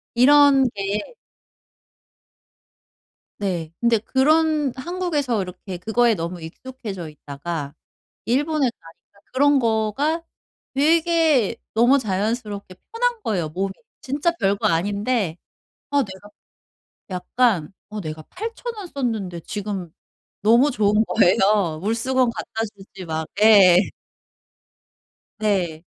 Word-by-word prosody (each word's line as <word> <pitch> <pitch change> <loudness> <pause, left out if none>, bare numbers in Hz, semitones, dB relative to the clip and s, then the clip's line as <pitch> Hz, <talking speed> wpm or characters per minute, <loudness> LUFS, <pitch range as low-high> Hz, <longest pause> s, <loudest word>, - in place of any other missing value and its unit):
이런 275 +1 +6
게 200 +1 -2 2.4
네. 180 -6 -2
근데 235 -1 +4
그런 300 +4 +2
한국에서 295 - -1
이렇게 180 0 -7
그거에 225 +5 +2
너무 170 0 -5
익숙해져 195 0 -8
있다가 145 0 -6 0.5
일본에 285 +2 +1
가니까 165 +4 -19
그런 285 +1 +4
거가 235 +8 0 0.5
되게 315 - +3 0.2
너무 240 +5 +4
자연스럽게 205 -1 -3 0.2
편한 475 0 0
거예요 175 -7 -1
몸이. 190 +4 -3 0.3
진짜 285 +6 0
별거 200 0 +1
아닌데 200 +2 0 0.5
'아 285 -1 +3
내가' 190 0 -11 0.8
약간 185 -2 0 0.2
'어 210 0 -6
내가 155 -3 -6
8,000 460 - -6
원 410 -3 -7
썼는데 220 - -3
지금.' 195 -1 -5 0.5
너무 235 +7 +5
좋은 210 -3 +2
거예요. 195 -5 +2
물수건 240 +4 +1
갖다 225 -1 -5
주지 195 -1 -11
막 160 -1 -4
예. 200 -5 +8 1.6
네. 180 -7 0
215 Hz, 210 characters per minute, -22 LUFS, 185-270 Hz, 2.4 s, 예